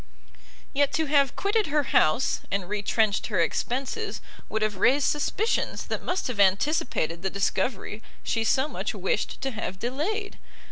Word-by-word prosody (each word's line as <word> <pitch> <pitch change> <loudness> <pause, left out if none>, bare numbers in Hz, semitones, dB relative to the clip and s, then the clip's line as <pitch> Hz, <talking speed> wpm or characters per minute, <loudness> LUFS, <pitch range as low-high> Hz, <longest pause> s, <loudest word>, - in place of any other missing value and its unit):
Yet 285 0 +3
to 320 - +1
have 280 -3 +3
quitted 415 +2 +1
her 300 0 +2
house, 155 - +3
and 195 -2 -1
retrenched 210 +1 +1
her 205 -5 0
expences, 265 - -1 0.3
would 220 0 -1
have 210 -2 -1
raised 270 +8 +4
suspicions 410 +9 0
that - - -3
must 360 +1 -2
have 245 -5 -3
anticipated 195 - +2
the 190 - 0
discovery 200 +2 -1 0.2
she 225 - 0
so 265 +5 +2
much - - -4
wished - - -1
to 270 0 -1
have 215 -5 -4
delayed. 320 - -3
250 Hz, 150 wpm, -26 LUFS, 200-300 Hz, 0.3 s, raised